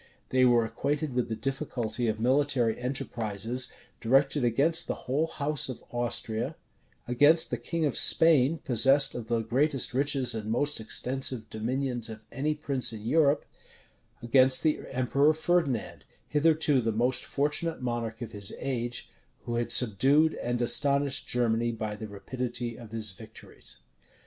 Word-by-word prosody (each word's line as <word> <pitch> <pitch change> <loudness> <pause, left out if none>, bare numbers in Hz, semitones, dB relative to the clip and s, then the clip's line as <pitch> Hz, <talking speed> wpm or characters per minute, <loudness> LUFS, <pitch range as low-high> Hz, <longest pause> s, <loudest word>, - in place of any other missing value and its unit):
They 130 0 +3
were 120 -2 +4
acquainted 140 +5 -2
with 125 -1 -1
the 110 - -2
difficulty 125 -4 -3
of 110 0 -1
military 125 -2 +1
enterprises 120 -2 -1 0.3
directed 135 +3 +2
against 140 +8 +3
the - - -2
whole 145 +6 0
house 150 -3 -1
of 130 - -7
Austria; 120 +2 -2 0.5
against 145 +7 +4
the 125 - -1
king 160 +7 -2
of 140 - -1
Spain, 160 -2 +4
possessed 135 +3 +3
of 115 -2 -6
the 115 -1 0
greatest 135 +5 0
riches 135 -1 +1
and 110 -1 -5
most 145 +5 0
extensive 125 +2 -2
dominions 120 +1 -2
of 110 -1 -8
any 150 +3 -1
prince 140 -5 +1
in 110 -1 -8
Europe; 145 +2 +2 0.8
against 130 +2 +4
the 155 -1 +2
emperor 140 +4 +2
Ferdinand, 160 -6 -1 0.2
hitherto 150 -2 +2
the 115 -1 -1
most 125 +3 0
fortunate 150 +4 -1
monarch 120 -2 -4
of 115 - -8
his 100 -2 -6
age, 120 -3 -4 0.4
who 120 - -5
had 120 0 -1
subdued 135 +8 +4
and 120 0 -1
astonished 140 +2 +1
Germany 120 -1 +1
by 110 -2 -4
the 110 +1 -7
rapidity 120 +3 -5
of 115 -3 -11
his 110 -3 -2
victories. 95 - -9
125 Hz, 145 wpm, -28 LUFS, 115-140 Hz, 0.8 s, were